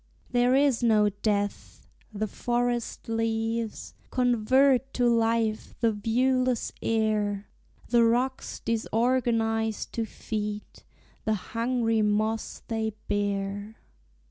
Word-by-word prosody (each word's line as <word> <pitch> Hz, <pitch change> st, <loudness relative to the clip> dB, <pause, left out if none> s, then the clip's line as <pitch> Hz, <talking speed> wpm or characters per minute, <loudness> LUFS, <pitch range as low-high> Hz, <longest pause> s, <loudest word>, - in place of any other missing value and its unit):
There 245 Hz, +1 st, +3 dB
is 275 Hz, -3 st, +3 dB
no 215 Hz, -3 st, +4 dB
death! 205 Hz, 0 st, -2 dB, 0.3 s
the 215 Hz, 0 st, -2 dB
forest 240 Hz, +2 st, -2 dB
leaves 225 Hz, 0 st, -2 dB, 0.2 s
Convert 255 Hz, +2 st, +3 dB
to 245 Hz, -1 st, +3 dB
life 230 Hz, -2 st, +1 dB
the 230 Hz, -2 st, +3 dB
viewless 250 Hz, +3 st, +1 dB
air; 210 Hz, -2 st, 0 dB, 0.4 s
The 235 Hz, -1 st, +5 dB
rocks 245 Hz, +3 st, 0 dB
disorganize 225 Hz, -1 st, 0 dB
to 230 Hz, -, -3 dB
feed 210 Hz, -1 st, -4 dB, 0.6 s
The 220 Hz, -1 st, +2 dB, 0.2 s
hungry 230 Hz, -1 st, +1 dB
moss 215 Hz, +1 st, 0 dB
they 220 Hz, -1 st, -2 dB
bear. 205 Hz, +1 st, -2 dB
225 Hz, 95 wpm, -27 LUFS, 215-245 Hz, 0.6 s, The